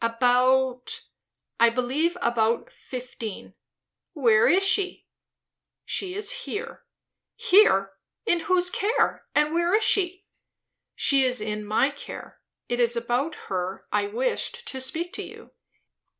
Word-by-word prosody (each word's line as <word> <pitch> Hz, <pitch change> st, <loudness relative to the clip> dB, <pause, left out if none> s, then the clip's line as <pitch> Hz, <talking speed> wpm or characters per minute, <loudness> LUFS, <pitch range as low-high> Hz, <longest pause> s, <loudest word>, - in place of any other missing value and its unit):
"About 255 Hz, -, +2 dB, 0.6 s
I 235 Hz, 0 st, +6 dB
believe, 265 Hz, +9 st, -1 dB
about 230 Hz, -1 st, 0 dB
fifteen." 245 Hz, -4 st, -8 dB, 0.6 s
"Where 230 Hz, -8 st, +4 dB
is 385 Hz, +2 st, +4 dB
she?" 380 Hz, 0 st, +1 dB, 0.8 s
"She 370 Hz, -1 st, -3 dB
is 415 Hz, +3 st, -2 dB, 0.2 s
here." 470 Hz, +3 st, -6 dB, 0.5 s
"Here! 195 Hz, -, +4 dB, 0.3 s
In 345 Hz, -6 st, +2 dB
whose 360 Hz, +1 st, +2 dB
care? 425 Hz, +5 st, 0 dB
and 300 Hz, +1 st, +2 dB
where 345 Hz, +3 st, +2 dB
is 435 Hz, -, +2 dB
she?" 375 Hz, -1 st, +1 dB, 0.7 s
"She 275 Hz, -1 st, +3 dB
is 250 Hz, -2 st, +2 dB
in 210 Hz, 0 st, -3 dB
my 215 Hz, +7 st, +1 dB
care. 285 Hz, -, -10 dB, 0.3 s
It 245 Hz, -, -2 dB
is 240 Hz, 0 st, +2 dB
about 245 Hz, +6 st, -1 dB
her 185 Hz, 0 st, -3 dB
I 405 Hz, -, +1 dB
wished 475 Hz, +1 st, -3 dB
to 265 Hz, -, -5 dB
speak 330 Hz, +7 st, -3 dB
to -, -, -5 dB
you." -, -, -13 dB
270 Hz, 125 wpm, -25 LUFS, 235-370 Hz, 0.8 s, I